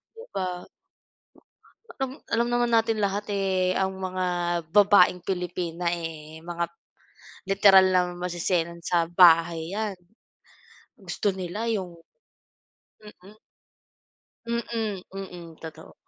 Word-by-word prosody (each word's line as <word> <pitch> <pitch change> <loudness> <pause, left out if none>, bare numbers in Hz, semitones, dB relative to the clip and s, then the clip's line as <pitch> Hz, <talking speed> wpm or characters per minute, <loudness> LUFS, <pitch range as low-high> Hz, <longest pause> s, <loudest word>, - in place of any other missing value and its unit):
di 455 - -11
ba? 180 -1 -3 1.3
Alam 265 -2 -3 0.2
alam 235 +1 +2
naman 240 0 +1
natin 225 -1 +2
lahat 205 +1 -1
eh, 190 -2 +1
ang 190 0 -1
mga 185 -1 -3 0.5
babaeng 200 -3 +5
Pilipina 180 -2 -3
eh, 160 -2 -5
mga 170 0 -3 0.8
literal 195 -1 +6
na 180 - +6
maseselan 175 -1 -2
sa 170 -1 +1
bahay 165 -1 +5
'yan. 210 -1 -3 1.0
Gusto 210 - -2
nila 190 +5 -4
yung 190 -6 -2 1.1
Mm. 210 0 -16 1.1
Mm, 225 -4 -3
mm. 180 -4 -8
Totoo. 160 -1 -11
185 Hz, 100 wpm, -26 LUFS, 175-205 Hz, 1.3 s, literal